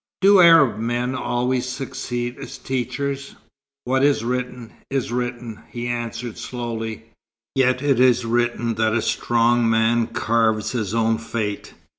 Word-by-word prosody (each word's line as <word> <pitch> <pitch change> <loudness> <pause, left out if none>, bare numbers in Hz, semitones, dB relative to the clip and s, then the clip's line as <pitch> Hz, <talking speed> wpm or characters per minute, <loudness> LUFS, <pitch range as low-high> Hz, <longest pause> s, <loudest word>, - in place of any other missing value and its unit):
"Do 195 0 +6
Arab 165 -10 +6
men 120 +2 -1
always 125 0 -1
succeed 120 -2 -4
as 135 - -8
teachers?" 140 +2 -3 0.5
"What 130 +2 +1
is 140 -5 +3
written 125 -1 -4 0.2
is 135 -3 -2
written," 120 -2 -4
he 120 0 -5
answered 120 -1 -4
slowly. 115 -2 -5 0.4
"Yet 130 0 +2
it 140 -4 +2
is 125 -1 +4
written 120 0 0
that 110 0 +2
a 115 - 0
strong 120 0 +2
man 115 +1 +2
carves 110 -2 0
his 110 -4 -2
own 115 0 +1
fate. 110 -3 -4
120 Hz, 135 wpm, -22 LUFS, 115-125 Hz, 0.5 s, Do